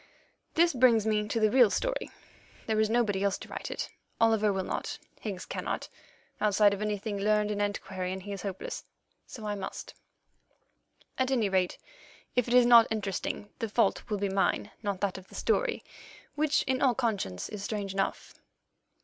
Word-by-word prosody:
This 340 Hz, 0 st, +4 dB
brings 240 Hz, -4 st, +4 dB
me 210 Hz, -1 st, +1 dB
to 225 Hz, -, -1 dB
the 215 Hz, -1 st, +3 dB
real 245 Hz, -4 st, +6 dB
story. -, -, -1 dB, 0.6 s
There 220 Hz, -1 st, 0 dB
is 215 Hz, 0 st, +3 dB
nobody 220 Hz, -4 st, +1 dB
else 200 Hz, -1 st, +1 dB
to -, -, -10 dB
write -, -, -5 dB
it; -, -, -4 dB, 0.3 s
Oliver 220 Hz, -2 st, +4 dB
will 190 Hz, -1 st, -1 dB
not; -, -, -3 dB, 0.2 s
Higgs 195 Hz, -4 st, -5 dB
cannot -, -, -4 dB, 0.5 s
(outside 210 Hz, -1 st, +4 dB
of 200 Hz, -, -4 dB
anything 210 Hz, 0 st, -2 dB
learned 210 Hz, +1 st, +2 dB
and 205 Hz, 0 st, -1 dB
antiquarian, 190 Hz, -2 st, -3 dB
he 205 Hz, +2 st, -8 dB
is 200 Hz, -2 st, -5 dB
hopeless); 190 Hz, -1 st, -5 dB, 0.4 s
so 220 Hz, -4 st, -9 dB
I 210 Hz, -, -1 dB
must. 195 Hz, -2 st, -6 dB, 1.3 s
At 260 Hz, 0 st, +2 dB
any 235 Hz, -6 st, +2 dB
rate, 185 Hz, -2 st, +1 dB, 0.6 s
if 250 Hz, -1 st, +2 dB
it 240 Hz, -, -1 dB
is 250 Hz, -1 st, +7 dB
not 235 Hz, -1 st, +8 dB
interesting, 205 Hz, -1 st, -3 dB
the 225 Hz, -, -2 dB
fault 230 Hz, +3 st, +2 dB
will 210 Hz, -, 0 dB
be 200 Hz, 0 st, 0 dB
mine, 195 Hz, +2 st, 0 dB
not 200 Hz, -3 st, -3 dB
that 195 Hz, -2 st, -1 dB
of 190 Hz, -, -17 dB
the -, -, -14 dB
story, -, -, 0 dB, 0.5 s
which 300 Hz, 0 st, +2 dB
in 260 Hz, -1 st, 0 dB
all 255 Hz, -3 st, +4 dB
conscience 205 Hz, -, -1 dB
is 210 Hz, -2 st, -7 dB
strange 200 Hz, -2 st, -3 dB
enough. 195 Hz, 0 st, -2 dB
210 Hz, 175 wpm, -29 LUFS, 200-230 Hz, 1.3 s, not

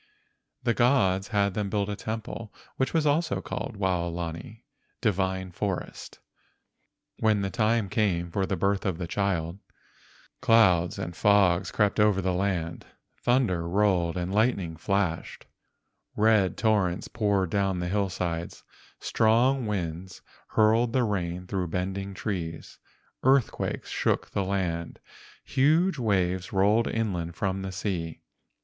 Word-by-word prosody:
The 120 Hz, -1 st, +2 dB
gods 105 Hz, -7 st, +2 dB
had 100 Hz, -2 st, +1 dB
them 105 Hz, 0 st, -2 dB
build 100 Hz, -1 st, 0 dB
a 105 Hz, -, -3 dB
temple 110 Hz, +1 st, -6 dB, 0.3 s
which 130 Hz, -, 0 dB
was 160 Hz, -2 st, +1 dB
also 155 Hz, +3 st, +1 dB
called 120 Hz, -6 st, -5 dB
Waolani 85 Hz, +2 st, -3 dB, 0.4 s
(divine 95 Hz, -4 st, -1 dB
forest). 95 Hz, +1 st, -4 dB, 1.0 s
When 110 Hz, -2 st, +2 dB
the 95 Hz, -, -2 dB
time 110 Hz, -1 st, +1 dB
came 90 Hz, -4 st, 0 dB
for 95 Hz, +2 st, 0 dB
the 95 Hz, -, -1 dB
birth 100 Hz, +2 st, 0 dB
of 95 Hz, -4 st, -1 dB
the 90 Hz, -, -4 dB
child, 90 Hz, -1 st, -1 dB, 0.8 s
clouds 105 Hz, -8 st, +4 dB
and 85 Hz, -, -5 dB
fogs 95 Hz, -2 st, +3 dB
crept 105 Hz, -1 st, +1 dB
over 105 Hz, -2 st, +4 dB
the 95 Hz, -1 st, 0 dB
land, 90 Hz, -3 st, -2 dB, 0.3 s
thunder 110 Hz, -10 st, +1 dB
rolled 90 Hz, -3 st, +2 dB
and 90 Hz, +2 st, -3 dB
lightning 100 Hz, -7 st, +1 dB
flashed, 95 Hz, 0 st, -2 dB, 0.7 s
red 105 Hz, -4 st, +3 dB
torrents 100 Hz, -6 st, +1 dB
poured 100 Hz, -5 st, 0 dB
down 100 Hz, -2 st, +1 dB
the 90 Hz, 0 st, -2 dB
hillsides, 90 Hz, -3 st, -2 dB, 0.4 s
strong 120 Hz, +3 st, +2 dB
winds 90 Hz, -2 st, -4 dB, 0.2 s
hurled 115 Hz, +2 st, +3 dB
the 130 Hz, -, +3 dB
rain 90 Hz, -4 st, -2 dB
through 90 Hz, -1 st, -2 dB
bending 95 Hz, +3 st, -3 dB
trees, 85 Hz, -6 st, -5 dB, 0.4 s
earthquakes 130 Hz, -2 st, +1 dB
shook -, -, 0 dB
the 100 Hz, -, 0 dB
land, 90 Hz, -3 st, -2 dB, 0.4 s
huge 155 Hz, +5 st, +2 dB
waves 95 Hz, -5 st, 0 dB
rolled 105 Hz, +4 st, +3 dB
inland 90 Hz, -7 st, -2 dB
from 95 Hz, +1 st, -2 dB
the 95 Hz, 0 st, -4 dB
sea. 90 Hz, -4 st, -4 dB
100 Hz, 130 wpm, -27 LUFS, 90-110 Hz, 1.0 s, clouds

